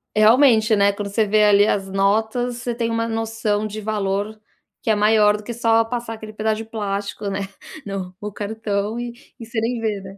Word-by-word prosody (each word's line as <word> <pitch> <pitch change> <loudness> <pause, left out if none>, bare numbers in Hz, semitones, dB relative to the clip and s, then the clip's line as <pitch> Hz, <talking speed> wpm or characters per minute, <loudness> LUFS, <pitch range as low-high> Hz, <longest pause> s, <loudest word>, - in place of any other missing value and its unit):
realmente, 220 0 +5
né, 200 0 +4
quando 200 0 -5
você 215 +2 +1
vê 210 +1 +4
ali 205 0 +6
as 195 -2 0
notas, 220 +5 +1
você 240 -1 -3
tem 230 -1 -1
uma 230 0 -1
noção 225 -2 -1
de 215 0 -5
valor 205 0 -2 0.4
que - - -2
é 215 - +4
maior 210 0 +4
do 210 - -11
que 235 - -5
só 230 -1 +3
passar 235 -1 -4
aquele 215 -1 -10
pedaço 215 0 0
de 225 - -6
plástico, 205 -2 -4
né, 195 0 -2 0.4
no 190 -2 -5
o 210 - -4
cartão 210 +1 -3
e 240 0 -5 0.3
e 230 - -7
você 230 0 -3
nem 235 +1 -1
vê, 215 -3 -2
né. 195 +1 -11
215 Hz, 205 wpm, -21 LUFS, 205-225 Hz, 0.4 s, ali